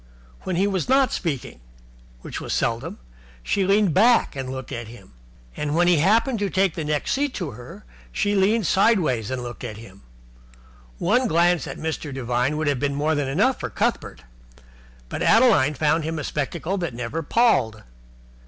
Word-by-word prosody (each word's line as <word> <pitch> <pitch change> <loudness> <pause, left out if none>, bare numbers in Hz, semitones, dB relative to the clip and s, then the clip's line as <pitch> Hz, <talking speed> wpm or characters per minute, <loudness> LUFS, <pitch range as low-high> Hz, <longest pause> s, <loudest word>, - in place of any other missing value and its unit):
When 185 - -3
he 190 +3 +2
was 195 +2 -1
not 270 0 +4
speaking 140 - -4 0.6
which - - -7
was - - -4
seldom - - -2 0.5
she 195 - 0
leaned 200 -3 +3
back 230 -2 +4
and 135 -1 -5
looked 130 -1 -7
at 120 -1 -5
him. 110 - -14 0.4
And 150 0 -2
when 175 +1 +3
he 175 -2 +4
happened 225 - +2
to 200 -1 -1
take 190 -2 +1
the 160 - -4
next 150 -1 -1
seat 280 0 -1
to 175 -7 -4
her, 125 - -12 0.3
she 205 -1 0
leaned 205 +2 +2
sideways 165 - +2
and 130 -1 -3
looked 120 +1 -8
at 110 -4 -6
him. 100 -3 -13 1.0
One 250 - +2
glance 175 -2 +2
at - - -7
Mr. 160 -2 -4
Devine 125 +2 -1
would 155 - -1
have 145 -3 0
been 140 +1 -1
more 150 +2 0
than 145 -3 -1
enough 200 - +1
for - - -4
Cuthbert; 65 - -2 0.8
but - - -6
Adeline 200 - +4
found 155 +2 +1
him 160 +1 -3
a 150 - -4
spectacle 170 +7 -3
that 170 -9 -4
never 125 +7 -4
palled. 145 - +1
160 Hz, 180 wpm, -23 LUFS, 130-200 Hz, 1.0 s, not